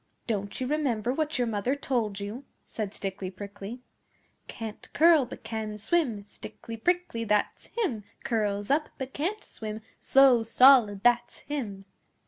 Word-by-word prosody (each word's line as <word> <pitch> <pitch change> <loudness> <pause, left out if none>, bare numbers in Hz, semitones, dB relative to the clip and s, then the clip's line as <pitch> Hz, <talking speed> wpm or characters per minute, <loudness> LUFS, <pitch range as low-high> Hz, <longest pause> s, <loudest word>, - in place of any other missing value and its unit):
'Don't 200 -3 -3
you 260 - -1
remember 255 -5 0
what 310 +1 -1
your 245 - +2
mother 225 +4 0
told 230 -8 -1
you?' 210 +7 -6 0.2
said 210 -3 -4
Stickly 195 -2 -5
Prickly, 200 +4 -8 0.7
'Can't 220 -2 -8
curl, 320 -3 +6
but - - -10
can 215 -2 -4
swim 220 -3 0
Stickly 225 +2 -9
Prickly, 350 -2 0
that's 210 -2 0
him! 295 - -2 0.2
Curls 205 -1 -1
up, 300 +2 +2
but 265 -1 -6
can't 390 +9 -2
swim 215 0 -6 0.2
Slow 265 -3 +6
Solid, 230 -3 +6
that's 240 0 +2
him! 215 -10 -5
230 Hz, 140 wpm, -28 LUFS, 210-275 Hz, 0.7 s, curl